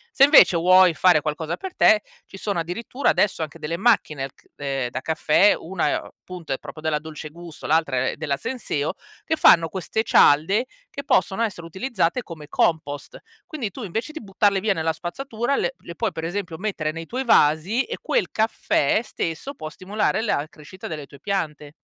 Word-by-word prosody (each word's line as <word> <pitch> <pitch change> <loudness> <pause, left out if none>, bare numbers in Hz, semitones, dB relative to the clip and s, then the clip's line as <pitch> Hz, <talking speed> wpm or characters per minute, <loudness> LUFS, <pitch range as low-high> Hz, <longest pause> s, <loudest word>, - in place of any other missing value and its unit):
Se, 270 - +6
invece, 275 - +7
vuoi 180 +1 +6
fare 180 -1 +4
qualcosa 155 +2 -3
per 380 -1 -8
te, 215 -1 +5 0.2
ci 195 - -12
sono, 200 -3 -2
addirittura, 225 +11 -2
adesso 200 -5 +1
anche 155 -2 -5
delle 160 +3 -3
macchine 155 - +1
ch - - -27
ehm, 135 -3 -3
da 130 +1 -5
caffè, 160 +6 +3
una 175 +1 -2
è - - +1
o - - -14
punto, 175 -6 -6
è - - -2
proprio - - -10
della 155 -1 -1
Dolce 155 0 -8
Gusto, 170 0 -10
l'altra 145 -5 +1
è - - -4
della 145 -3 -2
Senseo, 160 - -3 0.3
che 320 - +1
fanno 165 - +6
queste 190 +6 -2
cialde 195 - +4 0.2
che 280 - -7
possono 190 -2 +1
essere 195 -7 -2
utilizzate 190 +3 -1
come 155 -6 -10
compost. 145 -3 -1 0.3
Quindi 280 - -5
tu, 250 - -8
invece, 220 - -4
di 320 - -7
buttarle 195 0 +1
via 210 0 +2
nella 160 -2 -1
spazzatura, 235 - -3
le - - -1
le 170 - -10
puoi, 225 0 -1
per 160 - -6
esempio, 175 -1 -4
mettere 185 -6 -2
nei 165 0 -7
tuoi 260 +2 -3
vasi 180 - +3
e 470 - -6
quel - - 0
caffè 215 -5 +1
stesso 170 - -4
può 155 - -7
stimolare 210 +6 -1
la 155 -9 -1
crescita 160 +5 -11
delle 150 -3 -6
tue 140 - -15
piante. 150 -6 -3
175 Hz, 190 wpm, -23 LUFS, 155-215 Hz, 0.3 s, invece